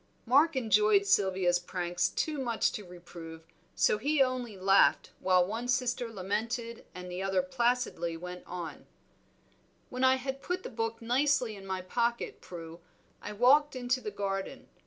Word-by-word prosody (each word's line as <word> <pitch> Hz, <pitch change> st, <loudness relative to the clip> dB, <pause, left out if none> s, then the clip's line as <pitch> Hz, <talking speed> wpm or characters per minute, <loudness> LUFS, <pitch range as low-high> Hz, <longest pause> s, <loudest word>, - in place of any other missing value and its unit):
Mark 285 Hz, +6 st, +4 dB
enjoyed 210 Hz, -4 st, +4 dB
Sylvia's 190 Hz, -3 st, +2 dB
pranks 175 Hz, 0 st, -1 dB
too 305 Hz, -2 st, -2 dB
much 235 Hz, -4 st, +1 dB
to 210 Hz, -, -6 dB
reprove, 170 Hz, -2 st, -11 dB, 0.3 s
so 210 Hz, -, +3 dB
he 290 Hz, +6 st, +1 dB
only 255 Hz, -5 st, 0 dB
laughed 195 Hz, +1 st, +4 dB
while 185 Hz, -1 st, +3 dB
one 225 Hz, +5 st, -4 dB
sister 245 Hz, -2 st, 0 dB
lamented 225 Hz, +4 st, -3 dB
and 180 Hz, 0 st, -7 dB
the 180 Hz, +1 st, -4 dB
other 195 Hz, +5 st, +1 dB
placidly 245 Hz, -10 st, 0 dB
went 180 Hz, +1 st, -8 dB
on 170 Hz, -3 st, -7 dB, 1.0 s
"When 255 Hz, 0 st, -2 dB
I 260 Hz, 0 st, +6 dB
had 265 Hz, +1 st, -5 dB
put 360 Hz, +4 st, -3 dB
the -, -, -7 dB
book 225 Hz, 0 st, -3 dB
nicely 250 Hz, -1 st, +1 dB
in 195 Hz, -1 st, -11 dB
my 190 Hz, -1 st, -3 dB
pocket, 235 Hz, +5 st, -1 dB
Prue, 165 Hz, -1 st, -9 dB, 0.4 s
I 210 Hz, -, -6 dB
walked 275 Hz, +7 st, +4 dB
into 255 Hz, 0 st, -1 dB
the 210 Hz, -, -4 dB
garden. 195 Hz, -1 st, -4 dB
220 Hz, 155 wpm, -30 LUFS, 185-250 Hz, 1.0 s, I